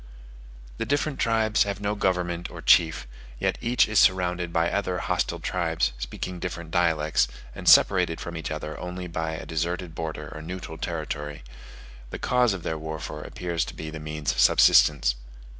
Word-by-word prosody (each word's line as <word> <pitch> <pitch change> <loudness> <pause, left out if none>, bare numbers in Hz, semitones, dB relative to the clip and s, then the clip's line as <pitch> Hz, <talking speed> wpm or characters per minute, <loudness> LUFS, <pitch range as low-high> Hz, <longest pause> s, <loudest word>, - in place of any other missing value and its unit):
The - - -1
different 145 0 0
tribes 110 -1 +2
have 100 -1 +1
no 100 0 -1
government 90 -3 -1
or - - -10
chief; 80 -2 +4 0.3
yet - - -1
each 120 +1 +3
is 110 -1 +3
surrounded 90 -2 +2
by 85 0 +1
other 95 -3 -1
hostile - - -1
tribes, 80 -8 0
speaking 90 +9 -5
different 85 -2 -5
dialects, 80 -3 +2 0.3
and - - +1
separated 90 -4 +5
from 85 - -6
each 80 - -4
other 75 0 -5
only 90 0 -5
by 80 -2 -3
a 80 - -6
deserted 85 +2 -3
border 80 -2 -5
or 80 - -8
neutral 80 -1 -7
territory: 75 -4 -4 0.7
the - - -5
cause 125 -4 +2
of 90 - -8
their 80 -1 -3
warfare 80 0 -6
appears 85 -2 -3
to - - -9
be 80 0 -6
the 80 - -7
means 75 -3 -2
of 60 - -4
subsistence. 70 +2 +5
85 Hz, 170 wpm, -26 LUFS, 80-90 Hz, 0.7 s, separated